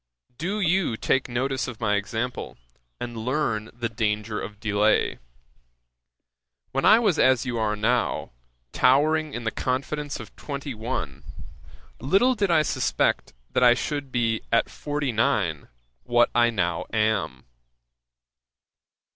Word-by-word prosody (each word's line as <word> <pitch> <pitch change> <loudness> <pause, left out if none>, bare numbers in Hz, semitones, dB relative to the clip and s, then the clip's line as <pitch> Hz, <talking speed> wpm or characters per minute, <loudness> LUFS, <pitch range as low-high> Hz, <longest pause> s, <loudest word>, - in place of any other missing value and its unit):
Do 190 +6 -2
you 180 - +1
take 130 +3 0
notice 130 +2 -1
of 120 -3 -7
my 105 -3 +1
example, 110 +4 -3 0.4
and 120 -1 -5
learn 115 -2 -1
the 120 0 -3
danger 105 -1 -2
of 105 +1 -8
delay. 105 0 +1 1.5
When 135 - 0
I 215 - +8
was 210 -8 +2
as 130 0 +4
you 120 -2 -2
are 105 -1 0
now, 115 +3 0 0.4
towering 155 +3 +3
in 120 - -4
the 110 - -1
confidence 140 +4 -3
of - - -11
twenty 140 -1 -5
one, 110 - -4 0.8
little 195 - +3
did 205 -5 0
I 160 -2 +4
suspect - - 0 0.2
that - - +1
I 120 -1 +7
should 140 0 -3
be 115 -2 0
at 115 - +2
forty 145 -2 -2
nine, 105 - 0 0.3
what 120 - +3
I 120 0 +4
now 85 -7 -1
am. 110 - 0
120 Hz, 130 wpm, -25 LUFS, 110-140 Hz, 1.5 s, I